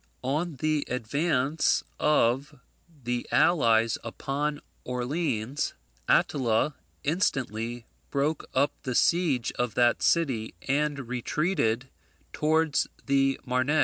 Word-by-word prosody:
On 150 +5 -1
the 155 +2 0
advance 140 +4 +1 0.2
of 135 -2 +2 0.4
the 120 0 -2
allies 115 -9 +3
upon 145 +5 -3 0.2
Orleans, 125 0 -2 0.3
Attila 130 +1 +2 0.3
instantly 120 - -1 0.2
broke 145 +2 -1
up 140 +2 +3
the 130 -2 -3
siege 155 -8 +2
of 120 -3 -1
that 120 -1 +3
city, 130 - +1
and 140 -1 0
retreated 125 -1 0 0.5
towards 155 -1 +2 0.2
the 135 -1 +2
Marne. 130 +2 0
135 Hz, 95 wpm, -27 LUFS, 120-150 Hz, 0.5 s, allies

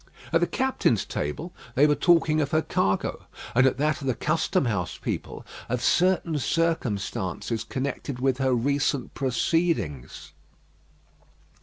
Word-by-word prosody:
At 165 - +4
the 175 - +3
captains' 255 - +1
table 155 - -4 0.2
they 140 - +6
were 150 - +4
talking 160 -1 +3
of 140 - -1
her 155 +1 +1
cargo; 95 0 -1 0.3
and 125 +2 +5
at 130 - 0
that 150 +2 0
of 135 - -4
the 130 - +1
custom 160 +3 0
house 95 -7 -2
people, - - -5 0.2
of 125 0 -1
certain 175 -1 +2
circumstances 115 - -1
connected 135 +1 -4
with 130 0 +1
her 130 -1 +2
recent 140 +1 0
proceedings. 125 - -1
135 Hz, 135 wpm, -26 LUFS, 120-160 Hz, 0.3 s, they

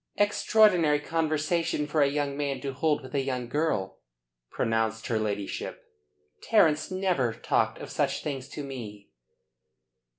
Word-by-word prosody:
"Extraordinary 205 -7 +4
conversation 160 0 0
for 150 +1 0
a 140 - +5
young 140 -1 -1
man 140 -2 -2
to 135 0 -4
hold 150 +1 0
with 130 - -11
a 140 - +1
young 130 -2 -3
girl," 135 -9 -1 0.5
pronounced 110 0 -1
her 115 -2 0
ladyship. 105 -2 -4 0.6
"Terence 155 -8 +3
never 185 -11 0
talked - - 0
of - - -8
such - - -1
things 140 -2 -4
to 150 - -6
me." 110 -7 -8
145 Hz, 135 wpm, -28 LUFS, 125-160 Hz, 0.6 s, a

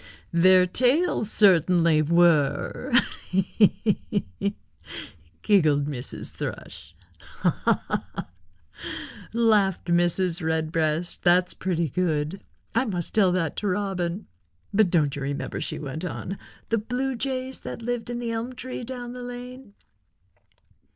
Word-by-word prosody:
"Their 185 +2 +6
tails 250 - +2
certainly 170 -5 +4
were—he, 175 - +2
he, 210 -1 +1
he," 200 +1 -1 0.9
giggled 155 -9 +4
Mrs. 135 -4 -5
Thrush. - - -7 0.2
"Ha, - - -1
ha, - - +2 0.3
ha," - - -5 1.0
laughed 210 -6 +2
Mrs. 175 0 +1
Redbreast. 160 +1 -1
"That's 180 +1 +3
pretty 170 -4 -1
good. 160 +2 -1 0.3
I 235 +3 +2
must 180 -7 -2
tell 195 -4 +4
that 165 -5 -1
to 210 - -2
Robin. 190 -1 -2 0.5
But 205 -2 +4
don't 150 -5 +2
you 145 - -5
remember," 140 +2 -3
she - - -4
went 150 +3 -6
on, 185 +1 -5 0.3
"the 230 - +2
Blue 250 +5 -2
Jays 260 +1 -3
that - - -7
lived 245 0 -3
in 240 - -3
the 240 -1 -3
elm 230 +3 -3
tree 255 0 -6
down 245 0 -6
the 250 - -7
lane?" 245 -2 -9
190 Hz, 125 wpm, -25 LUFS, 170-230 Hz, 1.0 s, Their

